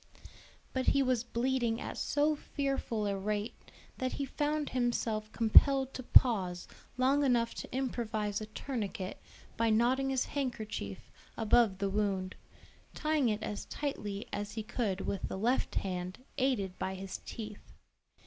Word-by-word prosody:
But 260 -1 -1
he 275 - +4
was 250 -3 +1
bleeding 240 -1 0
at - - -5
so 295 +2 +2
fearful 275 -7 -2
a 200 -1 0
rate 210 +3 -2 0.5
that 255 0 -1
he 280 - -2
found 295 +2 -1
himself 230 -3 0
compelled 265 +4 +5
to - - -5
pause 195 -8 +4 0.3
long 270 +3 +3
enough 240 -3 +2
to - - -7
improvise 220 -5 -1
a 215 - -5
tourniquet 215 -5 -4 0.4
by 230 0 +3
knotting 250 +5 +3
his 265 -1 +1
handkerchief 220 - -4 0.3
above 225 -3 +4
the 200 0 0
wound, 195 -2 0 0.6
tying 305 -5 +2
it 215 0 -1
as 205 - -4
tightly 210 -9 -4
as 205 +1 -3
he 220 - -3
could 210 -3 -1
with 195 - -2
the - - -4
left 240 +6 +1
hand 180 -1 -2 0.2
aided 210 -9 0
by 190 0 -2
his 190 0 -6
teeth. 210 -2 -8
230 Hz, 145 wpm, -32 LUFS, 205-260 Hz, 0.6 s, compelled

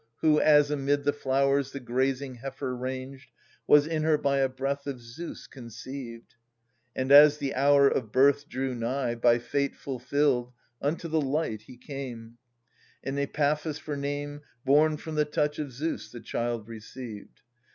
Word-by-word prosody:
Who, 150 -1 +4
as 150 -1 +5
amid 145 0 0
the 145 0 +2
flowers 140 0 +1
the 140 - -5
grazing 130 +1 -1
heifer 130 0 -5
ranged, 130 +2 -6 0.4
Was 145 0 +6
in 160 0 -1
h 155 - -1
er 155 -1 +4
by 140 -1 +1
a 135 -1 +2
breath 140 +2 -3
of 135 -3 -4
Zeus 120 +9 -9
conceived 120 -1 -9
j - - -33
• - - -43 0.6
And, 130 +1 -1
as 145 +1 +9
the 140 -2 -3
hour 140 +1 +5
of 115 -5 -1
birth 140 +3 +3
drew 130 0 -2
nigh. 120 +1 -1
By 120 0 +3
fate 140 +4 -2
fulfilled7 130 -1 -1 0.3
unto 160 +4 -2
the 160 -1 +1
light 140 -6 -1
he 125 - -12
came; 120 -4 -8 0.3
— - - -34
And 135 +1 -3
Epaphus 150 +2 0
for 150 - -5
name, 145 +1 -4 0.2
Born 150 +3 +4
from 160 +1 -7
the 150 0 +2
touch 150 0 -1
of 145 -3 -4
Zeus, 150 +7 -4
the 120 - -8
child 115 -2 -3
received. 115 -1 -10
140 Hz, 170 wpm, -28 LUFS, 125-145 Hz, 0.6 s, as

